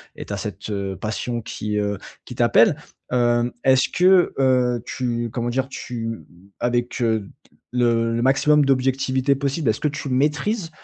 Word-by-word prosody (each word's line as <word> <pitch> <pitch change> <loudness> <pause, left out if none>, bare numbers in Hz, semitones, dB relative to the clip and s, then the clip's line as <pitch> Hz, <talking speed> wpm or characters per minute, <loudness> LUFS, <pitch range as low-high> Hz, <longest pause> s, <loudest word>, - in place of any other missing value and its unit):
et - - -8
tu 100 - -6
as - - -2
cette 100 +1 -5 0.2
passion 110 +4 -3
qui, 105 -1 -4
heu, 100 -2 -1 0.3
qui - - -8
t'appelle. - - +4 0.4
Hem, 120 -1 +2
est-ce 130 -1 +4
que, 180 0 +4
heu, 125 -3 +2
tu 120 -2 -2
comment 120 0 -2
dire? 130 +2 -1
Tu 115 -4 -6 0.3
avec 120 0 -1
le 110 -4 0 0.5
le 115 -1 +2
maximum 145 +3 +4
d'objectivité 130 0 +1
possible, 140 +2 -2
est-ce 110 - 0
que 150 - 0
tu 145 0 -5
maîtrises, 155 - 0
125 Hz, 150 wpm, -22 LUFS, 115-135 Hz, 0.5 s, t'appelle